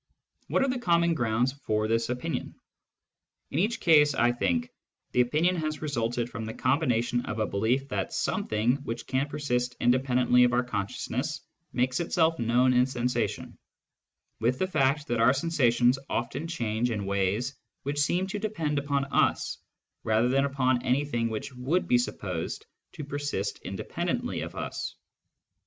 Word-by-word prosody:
What -, -, +2 dB
are -, -, +2 dB
the 255 Hz, -1 st, -1 dB, 0.3 s
grounds 120 Hz, -1 st, +1 dB
for 110 Hz, -6 st, -1 dB
this 115 Hz, +1 st, +1 dB
common 125 Hz, -, -2 dB
opinion? 125 Hz, -, -4 dB, 1.0 s
In 145 Hz, -, 0 dB
each 215 Hz, +6 st, +1 dB
case, 150 Hz, -4 st, +5 dB
I 120 Hz, -1 st, +4 dB
think, 85 Hz, -9 st, -1 dB, 0.4 s
the 125 Hz, -, +4 dB
opinion 155 Hz, +9 st, +2 dB
has 155 Hz, -1 st, -3 dB
resulted 120 Hz, -4 st, -1 dB
from 115 Hz, -2 st, -6 dB
the 110 Hz, -, -6 dB
combination 125 Hz, -3 st, +1 dB
of 110 Hz, -, -3 dB
a 110 Hz, -, +1 dB
belief 120 Hz, +8 st, 0 dB
that 100 Hz, -5 st, -2 dB
something 110 Hz, +5 st, 0 dB
which 120 Hz, -5 st, -6 dB
can 135 Hz, +2 st, -1 dB
persist 125 Hz, -4 st, -1 dB
independently 125 Hz, 0 st, +3 dB
of 125 Hz, 0 st, +3 dB
our 125 Hz, +1 st, +3 dB
consciousness 100 Hz, -5 st, -3 dB, 0.3 s
makes 125 Hz, +1 st, 0 dB
itself 165 Hz, -1 st, +1 dB
known 125 Hz, +2 st, +3 dB
in 125 Hz, +1 st, +4 dB
sensation, 125 Hz, -1 st, -2 dB, 0.8 s
with 120 Hz, +3 st, +1 dB
the 185 Hz, -, +1 dB
fact 145 Hz, -4 st, +1 dB
that 120 Hz, -4 st, 0 dB
our 120 Hz, +3 st, +6 dB
sensations 130 Hz, -4 st, +2 dB
often 120 Hz, +7 st, -2 dB
change 120 Hz, -7 st, -1 dB
in 105 Hz, -4 st, -2 dB
ways 100 Hz, +6 st, 0 dB, 0.3 s
which 145 Hz, +1 st, -2 dB
seem 175 Hz, +6 st, +1 dB
to 200 Hz, +2 st, -4 dB
depend 165 Hz, -9 st, -1 dB
upon 140 Hz, -1 st, 0 dB
us 140 Hz, -, +1 dB, 0.4 s
rather 110 Hz, +2 st, +2 dB
than 135 Hz, +2 st, +3 dB
upon 130 Hz, -3 st, +1 dB
anything 125 Hz, -3 st, 0 dB
which 110 Hz, +4 st, -5 dB
would 135 Hz, +9 st, 0 dB
be 125 Hz, -, +4 dB
supposed 90 Hz, -8 st, -4 dB, 0.3 s
to 150 Hz, -, -6 dB
persist 145 Hz, -8 st, -3 dB
independ 95 Hz, -, -4 dB
ently -, -, -3 dB
of -, -, -7 dB
us. -, -, -4 dB
125 Hz, 155 wpm, -28 LUFS, 115-145 Hz, 1.0 s, our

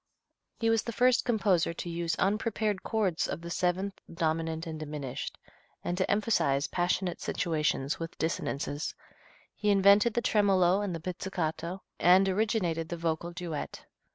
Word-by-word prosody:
He 225 Hz, -1 st, +2 dB
was 225 Hz, -1 st, +3 dB
the 235 Hz, -, -5 dB
first 250 Hz, +2 st, +3 dB
composer 195 Hz, -8 st, +2 dB
to -, -, -5 dB
use 170 Hz, 0 st, -1 dB
unprepared 210 Hz, 0 st, 0 dB
chords 200 Hz, -7 st, 0 dB
of -, -, -4 dB
the 170 Hz, 0 st, -7 dB
seventh, 185 Hz, +3 st, -1 dB
dominant 160 Hz, 0 st, -1 dB
and 160 Hz, -1 st, -5 dB
diminished, 145 Hz, -4 st, -5 dB, 0.5 s
and 175 Hz, -, -1 dB
to 185 Hz, +1 st, 0 dB
emphasize 200 Hz, -10 st, +2 dB
passionate 175 Hz, +1 st, -1 dB
situations 150 Hz, -4 st, 0 dB
with 165 Hz, 0 st, -6 dB
dissonances. 145 Hz, -2 st, -2 dB, 0.6 s
He 210 Hz, -, -1 dB
invented 200 Hz, +3 st, +5 dB
the 240 Hz, -, +2 dB
tremolo 195 Hz, -2 st, +3 dB
and 195 Hz, -4 st, -2 dB
the -, -, -4 dB
pizzicato, 175 Hz, 0 st, -3 dB, 0.2 s
and 185 Hz, +3 st, +6 dB
originated 185 Hz, -5 st, 0 dB
the 170 Hz, -, -3 dB
vocal 165 Hz, +1 st, -2 dB
duet. 170 Hz, -4 st, -5 dB
180 Hz, 145 wpm, -30 LUFS, 165-200 Hz, 0.6 s, and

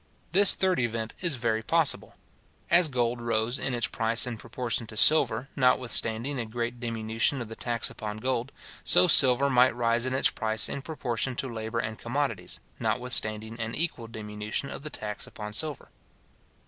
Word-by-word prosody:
This 200 Hz, +3 st, +7 dB
third 185 Hz, -2 st, 0 dB
event 115 Hz, -2 st, -3 dB
is 170 Hz, -5 st, +1 dB
very 115 Hz, -3 st, -1 dB
possible. 160 Hz, +5 st, 0 dB, 0.6 s
As 170 Hz, -1 st, +5 dB
gold 120 Hz, -2 st, -2 dB
rose 115 Hz, +2 st, -1 dB
in 130 Hz, -, -1 dB
its 120 Hz, -, 0 dB
price 115 Hz, +1 st, 0 dB
in 125 Hz, -2 st, -5 dB
proportion 115 Hz, +1 st, -4 dB
to 110 Hz, -, -8 dB
silver, 135 Hz, -2 st, +4 dB
notwithstanding 125 Hz, 0 st, +2 dB
a 115 Hz, -, -3 dB
great 120 Hz, +2 st, -5 dB
diminution 115 Hz, +2 st, -1 dB
of 120 Hz, -3 st, -7 dB
the 115 Hz, -, -8 dB
tax 120 Hz, -1 st, -1 dB
upon 105 Hz, -1 st, -7 dB
gold, 125 Hz, +2 st, -3 dB, 0.3 s
so -, -, +6 dB
silver 135 Hz, -4 st, +6 dB
might 125 Hz, -2 st, +3 dB
rise 120 Hz, +1 st, 0 dB
in 130 Hz, -, -2 dB
its 135 Hz, -, +3 dB
price 110 Hz, -1 st, 0 dB
in 140 Hz, -, -5 dB
proportion 130 Hz, -4 st, -4 dB
to 135 Hz, -, -2 dB
labour 110 Hz, -1 st, -6 dB
and 110 Hz, -1 st, -4 dB
commodities, 120 Hz, -7 st, -3 dB, 0.2 s
notwithstanding 110 Hz, -1 st, 0 dB
an 115 Hz, 0 st, -4 dB
equal 150 Hz, -8 st, -2 dB
diminution 105 Hz, +3 st, -5 dB
of -, -, -7 dB
the 150 Hz, -, -7 dB
tax 105 Hz, -7 st, -6 dB
upon 105 Hz, -1 st, -9 dB
silver. 150 Hz, +4 st, 0 dB
120 Hz, 170 wpm, -26 LUFS, 110-130 Hz, 0.6 s, This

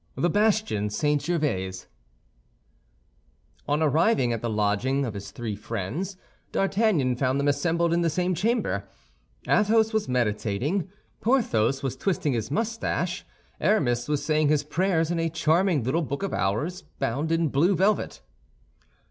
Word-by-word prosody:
THE 175 Hz, -, +1 dB
BASTION 210 Hz, -, +1 dB
SAINT 145 Hz, +6 st, 0 dB
GERVAIS 95 Hz, -, -1 dB, 1.8 s
On 150 Hz, +2 st, +1 dB
arriving 155 Hz, -, +3 dB
at 115 Hz, -, -3 dB
the 120 Hz, -, -2 dB
lodgings 110 Hz, +6 st, 0 dB
of 115 Hz, -, -4 dB
his 100 Hz, -1 st, -7 dB
three 110 Hz, 0 st, -5 dB
friends, 115 Hz, -, -4 dB, 0.3 s
D'Artagnan 195 Hz, -, +1 dB
found 130 Hz, +1 st, +1 dB
them 140 Hz, -, 0 dB
assembled 165 Hz, +4 st, +1 dB
in 170 Hz, -, +2 dB
the 170 Hz, -, +2 dB
same 180 Hz, +3 st, 0 dB
chamber. 230 Hz, +8 st, 0 dB, 0.6 s
Athos 220 Hz, +1 st, +3 dB
was 220 Hz, -10 st, 0 dB
meditating; 125 Hz, -, -1 dB, 0.3 s
Porthos 140 Hz, -, +1 dB
was 135 Hz, -2 st, -2 dB
twisting 165 Hz, -4 st, -1 dB
his 115 Hz, -3 st, -2 dB
mustache; 205 Hz, -2 st, -2 dB, 0.4 s
Aramis 120 Hz, -, +1 dB
was 150 Hz, -1 st, -1 dB
saying 155 Hz, -1 st, +2 dB
his 150 Hz, -1 st, +2 dB
prayers 165 Hz, +1 st, 0 dB
in 170 Hz, -, 0 dB
a 165 Hz, 0 st, 0 dB
charming 160 Hz, -, +2 dB
little 130 Hz, +8 st, 0 dB
Book 140 Hz, +2 st, -4 dB
of 195 Hz, -, -2 dB
Hours, 145 Hz, -, -1 dB, 0.2 s
bound 140 Hz, +4 st, -1 dB
in 165 Hz, -1 st, +2 dB
blue 165 Hz, +9 st, +3 dB
velvet. 195 Hz, -, 0 dB
150 Hz, 140 wpm, -26 LUFS, 125-185 Hz, 1.8 s, arriving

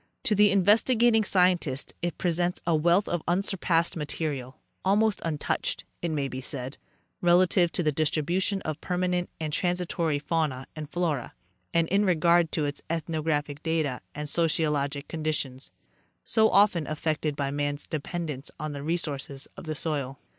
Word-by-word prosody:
To 250 Hz, -5 st, +3 dB
the 205 Hz, 0 st, +6 dB
investigating, 220 Hz, +4 st, +4 dB
scientist 180 Hz, -8 st, +2 dB
it 175 Hz, -1 st, -2 dB
presents 175 Hz, 0 st, 0 dB
a 170 Hz, -1 st, +3 dB
wealth 170 Hz, +6 st, +3 dB
of 175 Hz, -, -1 dB
unsurpassed 175 Hz, -2 st, +1 dB
material, 145 Hz, -4 st, -3 dB, 0.3 s
almost 205 Hz, +2 st, +2 dB
untouched, 155 Hz, -3 st, -2 dB, 0.2 s
it 170 Hz, -, -1 dB
may 145 Hz, -3 st, -1 dB
be 130 Hz, -1 st, -5 dB
said, 135 Hz, 0 st, -6 dB, 0.4 s
relative 175 Hz, 0 st, +4 dB
to 175 Hz, -, 0 dB
the 155 Hz, -, +2 dB
distri 155 Hz, +1 st, +1 dB
bution 190 Hz, +5 st, 0 dB
of 155 Hz, -1 st, -4 dB
permanent 180 Hz, -1 st, 0 dB
and 155 Hz, -2 st, -3 dB
transitory 175 Hz, -3 st, 0 dB
fauna 145 Hz, -3 st, -1 dB
and 155 Hz, -2 st, -6 dB
flora, 160 Hz, -7 st, -2 dB, 0.4 s
and 170 Hz, -1 st, +2 dB
in 200 Hz, +2 st, +3 dB
regard 170 Hz, -2 st, +3 dB
to 155 Hz, -, +1 dB
its 145 Hz, 0 st, -4 dB
ethnographic 155 Hz, -3 st, -1 dB
data 155 Hz, -6 st, -1 dB
and 150 Hz, 0 st, -4 dB
sociologic 150 Hz, -3 st, 0 dB
conditions, 155 Hz, -4 st, -3 dB, 0.5 s
so 220 Hz, -1 st, +3 dB
often 195 Hz, -7 st, +4 dB
af 155 Hz, -1 st, -4 dB
fected 155 Hz, -2 st, 0 dB
by 140 Hz, -1 st, -1 dB
man's 145 Hz, 0 st, -2 dB
dependence 155 Hz, -2 st, -4 dB
on 155 Hz, -1 st, -3 dB
the 140 Hz, -1 st, -5 dB
resources 145 Hz, -3 st, -3 dB
of -, -, -9 dB
the 155 Hz, -1 st, -3 dB
soil. 140 Hz, -4 st, -2 dB
160 Hz, 155 wpm, -27 LUFS, 145-180 Hz, 0.5 s, the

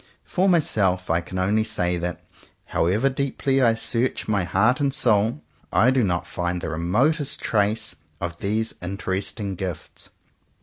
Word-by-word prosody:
For 190 Hz, +1 st, +1 dB
myself 95 Hz, -, +2 dB
I 85 Hz, +1 st, +2 dB
can 90 Hz, +2 st, -7 dB
only 100 Hz, +4 st, +2 dB
say 90 Hz, -5 st, -1 dB
that, 90 Hz, 0 st, -4 dB, 0.4 s
however 100 Hz, +10 st, +1 dB
deeply 135 Hz, 0 st, 0 dB
I 115 Hz, -3 st, +4 dB
search 120 Hz, +3 st, 0 dB
my 105 Hz, -3 st, +1 dB
heart 100 Hz, -, +2 dB
and 140 Hz, -1 st, +1 dB
soul, 115 Hz, +2 st, +2 dB, 0.3 s
I 125 Hz, +3 st, +4 dB
do 130 Hz, -2 st, +2 dB
not 90 Hz, -3 st, 0 dB
find 90 Hz, 0 st, -2 dB
the 85 Hz, -, -4 dB
remotest 125 Hz, -, +1 dB
trace 105 Hz, 0 st, 0 dB, 0.2 s
of 85 Hz, 0 st, -4 dB
these 110 Hz, +3 st, -1 dB
interesting 95 Hz, +2 st, -3 dB
gifts. 90 Hz, -3 st, -6 dB
105 Hz, 145 wpm, -24 LUFS, 90-125 Hz, 0.4 s, I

